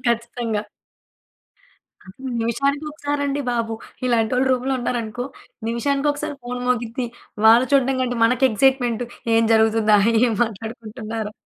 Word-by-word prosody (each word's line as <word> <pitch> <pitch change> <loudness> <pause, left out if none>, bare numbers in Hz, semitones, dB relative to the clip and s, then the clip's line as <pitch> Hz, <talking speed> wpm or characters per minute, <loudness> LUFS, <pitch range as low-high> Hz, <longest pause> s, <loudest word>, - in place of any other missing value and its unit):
ఖచ్చితంగా. 230 -2 -1 1.8
నిమిషానికి 275 +6 0
ఒకసారి 290 -1 -3
అండి 285 +1 -1
బాబు. 230 -1 -1 0.3
ఇలాంటోళ్లు 245 +2 +2
రూమ్‌లో 260 +1 0
ఉన్నారనుకో, 240 0 -3 0.4
నిమిషానికొకసారి 280 +5 -1
ఫోన్ 245 0 -5
మోగిద్ది. 240 0 -1 0.4
వాళ్లు 230 +3 +7
చూడటం 270 -1 +3
కంటే 245 -1 -1
మనకు 250 +3 +3
ఎక్సైట్‌మెంట్. 245 0 +2 0.3
ఏం 225 - +4
జరుగుతుందా? 220 -1 +4 0.3
ఏం 235 - +1
మాట్లాడుకుంటున్నారొ? 220 0 -6
240 Hz, 105 wpm, -22 LUFS, 225-265 Hz, 1.8 s, వాళ్లు